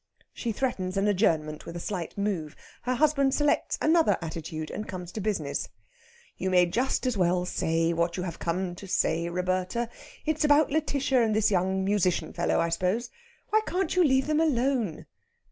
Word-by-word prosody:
She 235 - -3
threatens 200 -6 -2
an 195 +1 +2
adjournment 160 -7 +1
with 170 - -7
a - - -4
slight 180 -1 -4
move. 190 -7 -2 0.3
Her 255 +1 -1
husband 280 -1 +3
selects 295 -1 +1
another 325 +1 +3
attitude, 160 -1 -5
and 215 - -5
comes 180 -2 -6
to 215 - -5
business. 185 -9 -2 0.7
"You 190 - -1
may 180 -1 +5
just 245 +10 0
as 250 -4 0
well 180 0 +2
say 165 -1 0
what 170 +1 0
you 180 - -2
have 175 -2 -5
come 175 +1 -2
to 195 - -9
say, 170 -1 +1
Roberta. 185 +6 -1 0.4
It's 310 0 0
about 300 +1 +5
Lætitia 280 -4 +1
and 220 -2 +1
this 215 -1 +3
young 190 0 +1
musician 195 -3 +1
fellow, 175 - +1
I 170 - +1
suppose. 185 +8 -1 0.4
Why 435 +1 +4
can't 365 -1 -1
you 365 - +5
leave 265 -3 +3
them 305 0 +1
alone?" 255 - 0
195 Hz, 180 wpm, -27 LUFS, 175-265 Hz, 0.7 s, may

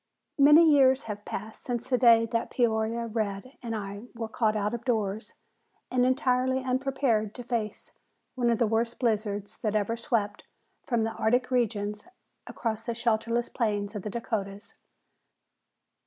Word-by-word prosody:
Many 300 +4 +8
years 265 -2 +5
have 210 -2 -7
passed 215 +2 -6
since 240 -2 -3
the 255 - +2
day 230 -2 +6
that 230 0 -1
"Peoria 230 -1 0
Red" 215 +2 -3
and 230 -3 -4
I 200 +2 -6
were 225 -1 -4
caught 220 -1 0
out 210 +1 -1
of 240 -1 -4
doors 220 -3 -1 0.6
and 250 0 +3
entirely 260 0 +1
unprepared 255 -4 0
to 245 - -7
face 230 -3 -4 0.3
one 245 -2 +1
of 230 - +2
the 235 - +2
worst 225 +2 0
blizzards 210 -4 -1
that 215 -1 -1
ever 215 +2 +1
swept 220 -3 -1
down - - -27
from 235 -3 +1
the 225 - -1
Arctic 245 +3 +1
regions 210 - -1 0.4
across 225 -2 -3
the 230 0 -4
shelterless 235 0 0
plains 205 -4 -1
of 205 - -4
the 210 - -5
Dakotas. 205 -3 -4
230 Hz, 155 wpm, -28 LUFS, 215-245 Hz, 0.6 s, Many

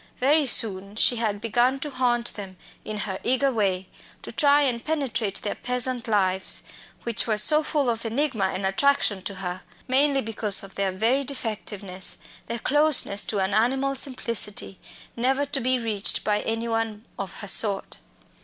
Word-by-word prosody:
Very 285 +3 +2
soon 200 -4 +1
she 240 +2 +2
had 215 -3 -2
begun 240 +4 +1
to 295 - -5
haunt 240 -2 0
them 195 -3 -9 0.3
in 215 - -5
her 190 -2 -5
eager 260 +2 +1
way, 190 -5 -1 0.4
to - - -6
try 290 -1 +3
and 240 -4 -1
penetrate 245 -10 -2
their 205 - -2
peasant 250 -1 -1
lives, 190 -3 +1 0.4
which 235 0 +1
were 215 -2 0
so 300 +8 +7
full 295 -3 -1
of 230 -1 -1
enigma 235 -2 -1
and 190 0 -3
attraction 205 -1 +1
to 195 +1 -6
her, 180 -1 -6 0.3
mainly 275 +1 +3
because 215 -3 +3
of 195 - -10
their 195 -1 -1
very 230 +9 0
defectiveness, 210 -7 -3 0.3
their 235 - -3
closeness 290 -6 +3
to 210 - -2
an 190 +1 -1
animal 265 +5 +1
simplicity, 230 -7 -1 0.4
never 265 +4 0
to 280 -1 -2
be 255 +2 +1
reached 220 -4 0
by 210 -1 0
any 225 +1 -3
one 225 -1 -3
of 195 -3 -5
her 205 - -6
sort. 200 0 +3
230 Hz, 165 wpm, -24 LUFS, 200-265 Hz, 0.4 s, so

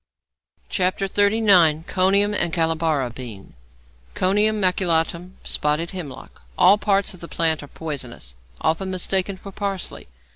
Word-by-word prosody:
XXXIX. 195 -3 +3
CONIUM 200 +2 +2
AND 175 -4 0
CALABAR 160 -4 0
BEAN 115 -6 -10 0.6
=Conium 210 +3 +2
Maculatum= 180 -1 0
(Spotted 150 +3 -1
Hemlock). 175 -8 -9 0.2
All 200 +3 +6
parts 200 -2 +1
of 185 - -13
the 170 - -8
plant 160 -2 +1
are 145 - -10
poisonous, 130 - -6 0.3
often 165 +5 0
mistaken 190 +1 0
for 195 +1 -11
parsley. 195 - -5
180 Hz, 115 wpm, -22 LUFS, 160-195 Hz, 0.6 s, All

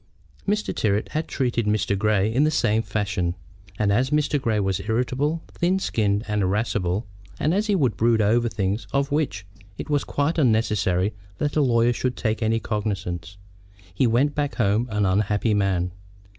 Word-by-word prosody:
Mr. 210 +1 0
Tyrrwhit 105 0 0
had 155 +1 -2
treated 120 -4 -1
Mr. 105 -1 +1
Grey 105 +1 +1
in 135 +5 +3
the 155 - +3
same 110 -8 +2
fashion; 95 -6 -2 0.4
and 105 -1 +2
as 125 +5 +2
Mr. 150 -1 +1
Grey 110 -4 +1
was 95 -2 0
irritable, 130 +8 0
thin 180 +2 +1
skinned, 105 - 0
and 105 -1 0
irascible, 100 0 0 0.3
and 155 +4 +1
as 210 +3 +1
he 205 - +2
would 130 - +1
brood 115 0 +3
over 115 +3 +2
things 100 +1 -2
of 140 +1 +1
which 130 -10 -1 0.3
it - - -6
was 145 -1 +2
quite 145 +4 -1
unnecessary 105 - +2 0.2
that 145 0 -1
a 155 - +3
lawyer 120 -2 +3
should 125 +1 -2
take 110 0 -1
any 110 0 +1
cognizance, 95 -5 -3 0.6
he 120 +7 +2
went 130 +6 +2
back 145 -1 -2
home 110 +1 +1
an 105 -1 0
unhappy 105 +3 +1
man. 95 -3 +1
110 Hz, 170 wpm, -24 LUFS, 100-135 Hz, 0.6 s, in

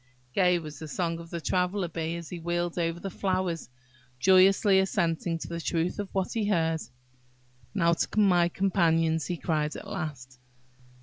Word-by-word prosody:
Gay 180 -2 +4
was 155 -3 -8
the 160 - -7
song 165 +2 -2
of 170 0 -10
the 170 - -4
Traveller 180 +2 0
bee 165 0 -3
as 170 -1 -7
he 175 - -5
wheeled 175 +1 -2
over 165 0 -1
the 195 +2 -5
flowers, 185 -5 -2 0.5
joyously 190 - +5
assenting 170 -3 0
to - - -7
the 170 0 -5
truth 170 +4 -1
of 205 -2 -3
what 190 -1 -1
he 220 -3 0
heard. 165 -5 +1 0.9
"Now 170 -4 +3
to 190 - -1
my 180 -4 +4
companions," 165 -4 +1
he 175 - -2
cried 155 -2 -1
at - - -8
last. 145 -10 -6
170 Hz, 170 wpm, -28 LUFS, 165-185 Hz, 0.9 s, joyously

